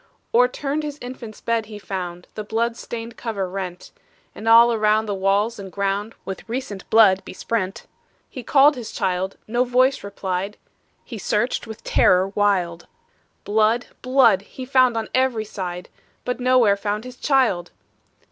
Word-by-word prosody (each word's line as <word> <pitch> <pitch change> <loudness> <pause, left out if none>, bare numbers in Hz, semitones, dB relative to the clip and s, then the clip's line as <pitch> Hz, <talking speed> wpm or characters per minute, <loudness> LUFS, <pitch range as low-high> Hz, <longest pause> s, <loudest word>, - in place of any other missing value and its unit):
O'erturned 275 +5 +2
his 295 -1 -5
infant's 245 -3 -9
bed 230 -2 -1
he 215 -1 -8
found, 180 -3 -6
The 215 - -5
blood 230 +2 -1
stained 230 -1 -7
cover 205 -5 -3
rent; 180 -1 -6 0.4
And 225 - -8
all 235 +1 +7
around 215 0 +2
the 205 - -2
walls 200 +4 +1
and 195 -1 -8
ground 200 +3 -2
With 195 +3 -7
recent 230 -5 -5
blood 205 -4 +6
besprent. 195 +1 -3 0.4
He 255 - -8
called 285 +4 +5
his 240 -3 -7
child 185 +1 -2
no 240 +3 +1
voice 255 +2 +2
replied; 195 0 -4 0.5
He 230 -4 -7
searched 215 +5 -1
with 220 -1 -9
terror 185 +1 +3
wild; 190 -4 0 0.6
Blood! 220 +3 +1
blood! 255 -6 +4
he 255 +5 -9
found 255 -2 +3
on 225 - -2
every 255 -4 +1
side, 180 -3 -6 0.4
But 250 +1 -2
nowhere 250 -5 +4
found 205 +1 -2
his 250 0 -9
child! 240 - +1
220 Hz, 150 wpm, -22 LUFS, 195-245 Hz, 0.6 s, all